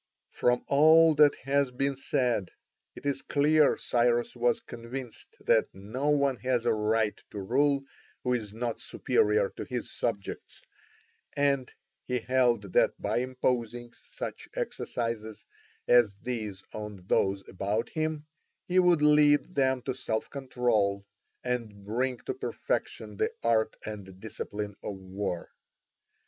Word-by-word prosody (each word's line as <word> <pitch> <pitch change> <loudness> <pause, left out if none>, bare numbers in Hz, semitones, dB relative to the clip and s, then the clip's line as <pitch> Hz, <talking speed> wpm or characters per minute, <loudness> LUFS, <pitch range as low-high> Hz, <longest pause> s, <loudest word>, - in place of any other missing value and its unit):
From 125 0 +1
all 160 +3 +6
that 150 -1 +6
has 140 0 +2
been 135 +2 -1
said, 125 -7 0 0.5
it - - -12
is 140 -1 0
clear 150 +1 +3
Cyrus 120 0 +1
was 120 0 +2
convinced 120 +1 -8
that - - +3
no 110 +9 -3
one 140 -3 +2
has 125 -2 0
a - - +3
right 110 0 +1
to 105 - -6
rule 140 +7 +2 0.4
who 125 - +1
is 110 -4 -2
not 115 +1 -3
superior 105 -1 +2
to - - -7
his 125 -2 -4
subjects, 100 -5 -4 0.7
and 140 -3 +1 0.4
he 125 - 0
held 120 -5 +1
that - - +3
by - - 0
imposing 120 -2 -2
such - - -8
exercises 115 -2 -3 0.4
as 120 -5 +5
these 110 -6 -4
on 105 -4 -7
those 95 0 +1
about 105 +5 -2
him, 155 -1 -2 0.4
he 185 +1 +3
would 175 -4 +4
lead 150 +2 +5
them 130 -4 +1
to - - -2
self 110 -4 -3
control 120 -7 0 0.4
and 115 -5 -3
bring 125 +4 -1
to - - -2
perfection 105 -2 -3
the - - +1
art 110 -1 +2
and 95 -3 -8
discipline 105 -1 -5
of 100 - -5
war. 95 -2 -4
120 Hz, 130 wpm, -29 LUFS, 105-135 Hz, 0.7 s, all